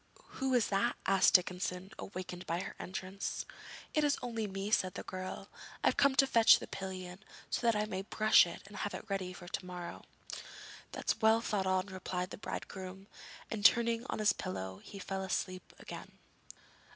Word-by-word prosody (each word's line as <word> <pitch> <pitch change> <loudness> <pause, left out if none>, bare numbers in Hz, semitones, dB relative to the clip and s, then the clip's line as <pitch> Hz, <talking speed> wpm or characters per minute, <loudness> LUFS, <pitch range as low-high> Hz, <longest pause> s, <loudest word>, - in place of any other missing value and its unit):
'Who 265 0 0
is 235 -4 +3
that?' 195 0 +2
asked 195 0 +5
Dickinson, 180 +1 +1
awakened 185 -1 -6
by 170 +2 0
her 195 - -5
entrance. 190 0 -4 0.5
'It 305 - +3
is 290 -1 +3
only 230 -3 -2
me,' 195 +1 -4
said 185 -4 +2
the - - -4
girl; 185 +1 -5 0.4
'I've - - +4
come 280 -1 +4
to 270 - +6
fetch 230 -4 +7
the - - -7
pillion, 185 -1 -6 0.3
so - - 0
that 230 - +5
I 210 0 +1
may 190 -3 -3
brush 215 -1 +5
it 170 - -8
and 205 +1 -10
have 205 - -2
it - - -7
ready 190 -2 -1
for 175 -1 -10
to 190 - -3
morrow.' 180 -1 -7 0.9
'That's 225 - -1
well 220 +1 +6
thought 205 -4 -1
on,' 185 0 +2
replied 185 -1 -4
the - - -7
bridegroom; 190 -1 -6 0.5
and, 210 -2 -3
turning 230 +1 +5
on - - -1
his 210 -2 +4
pillow, 95 - -5
he 200 - -9
fell 195 0 -3
asleep 185 -1 -2
again. - - -8
195 Hz, 180 wpm, -34 LUFS, 185-215 Hz, 0.9 s, fetch